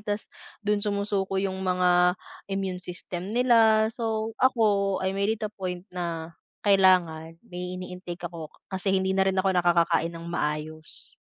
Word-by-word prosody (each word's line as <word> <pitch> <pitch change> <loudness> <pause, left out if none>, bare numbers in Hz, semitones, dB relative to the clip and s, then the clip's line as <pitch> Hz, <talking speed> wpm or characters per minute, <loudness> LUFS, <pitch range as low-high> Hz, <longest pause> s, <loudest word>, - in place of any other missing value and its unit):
tapos 205 0 -3 0.4
dun 210 0 +2
sumusuko 200 -2 -1
yung 190 -1 -2
mga 180 -1 +3 0.3
immune 195 -2 -3
system 180 +1 -6
nila. 225 -3 +5
So, 225 -1 -2
ako, 205 -6 +2
I 190 - 0
made 200 +3 +1
it - - -2
a 210 - -3
point 180 -2 -5
na 170 -2 -4 0.3
kailangan 180 -5 +3
may 180 0 -6
ini-intake 180 -1 -7
ako 165 -3 -8 0.2
kasi 190 +1 -2
hindi 190 0 +1
na 190 - +4
rin 190 - 0
ako 190 0 +2
nakakakain 170 -1 +2
ng 165 0 -9
maayos. 155 0 -4
185 Hz, 150 wpm, -26 LUFS, 175-200 Hz, 0.4 s, nila